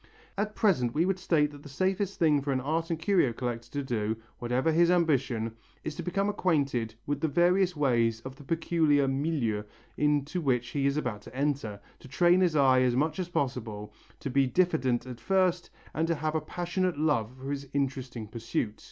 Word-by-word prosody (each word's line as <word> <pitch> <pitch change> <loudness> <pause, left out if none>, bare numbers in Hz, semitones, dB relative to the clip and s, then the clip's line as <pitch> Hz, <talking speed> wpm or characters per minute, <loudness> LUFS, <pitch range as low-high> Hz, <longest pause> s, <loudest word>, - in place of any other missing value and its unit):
At 210 +1 -2
present 130 - +2
we 165 +3 +3
would 190 0 0
state 150 -5 +2
that 145 -1 -12
the 145 - -11
safest 190 +6 -1
thing 150 -4 +3
for 140 +1 -2
an 130 - +1
art 160 +5 -1
and 165 - 0
curio 165 - +2
collector 120 -1 -4
to 145 -1 -2
do, 110 -4 -1 0.2
whatever 125 +6 +1
his 170 +2 +4
ambition, 135 -10 +1 0.3
is 155 - -4
to - - -6
become 195 +3 -1
acquainted 140 - 0
with 145 0 -2
the 160 - +2
various 180 +4 +3
ways 120 -6 +2
of 130 +2 -8
the 145 - -13
peculiar 160 -2 +2
milieu 135 -6 0 0.4
into 150 +3 +1
which 125 -5 0
he 140 -1 0
is 140 +1 0
about 120 -8 -2
to - - -13
enter, 135 -7 -1 0.2
to - - -13
train 175 +7 +4
his 175 -4 +2
eye 130 -3 +5
as 125 -1 +2
much 155 +7 0
as 180 -1 -3
possible, 115 -9 -3 0.3
to 140 - -3
be 135 +1 +3
diffident 130 -7 +1
at 125 -2 -8
first 185 -2 +1 0.2
and 160 +1 0
to 165 - +1
have 155 +1 -2
a 160 - 0
passionate 175 0 -2
love 145 -8 +1
for 135 +2 -6
his 140 -1 -4
interesting 130 -4 -2
pursuit. 110 -1 -3
145 Hz, 195 wpm, -29 LUFS, 125-170 Hz, 0.4 s, eye